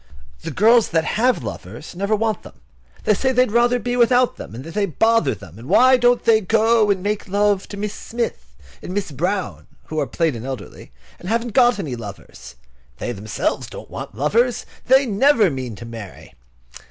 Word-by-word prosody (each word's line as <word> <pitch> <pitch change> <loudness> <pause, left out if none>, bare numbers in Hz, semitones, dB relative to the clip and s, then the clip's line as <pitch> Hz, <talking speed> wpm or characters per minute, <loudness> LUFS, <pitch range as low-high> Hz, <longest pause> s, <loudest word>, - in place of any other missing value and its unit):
The - - -5
girls 230 +3 +4
that 165 -1 +1
have 245 - +1
lovers 110 - -8
never 200 +4 0
want 220 0 -1
them. - - -15 0.4
They 215 - +3
say 260 +6 0
they 250 0 +4
would 255 - -4
rather 240 +2 +3
be 245 0 -3
without 245 +1 +3
them, - - -10
that 160 +5 -9
they 205 -1 0
bother 225 +7 +2
them, 100 0 -13
and 120 - -11
why 255 +1 +6
don't 245 0 +3
they 225 -1 +5
go 220 +2 +3
and 190 -2 0
make 210 0 -2
love 200 0 +1
to 200 - -8
Miss 210 0 -3
Smith 235 +2 -5 0.3
and 185 - -6
Miss 200 -5 -2
Brown, 180 +7 -3 0.2
who 155 - -4
are 145 - -1
plain 165 -3 0
and 115 -1 -7
elderly, 130 - -8 0.3
and 180 - -7
haven't 230 0 -1
got 245 -3 +4
any 155 -11 -4
lovers? 100 - -10 0.4
They - - -4
themselves 105 -1 -3
don't - - -11
want - - -7
lovers. 230 - +1 0.2
They 265 +2 +5
never 225 - +3
mean 130 -4 -5
to 120 - -10
marry. 115 -5 -10
205 Hz, 190 wpm, -21 LUFS, 145-235 Hz, 0.4 s, why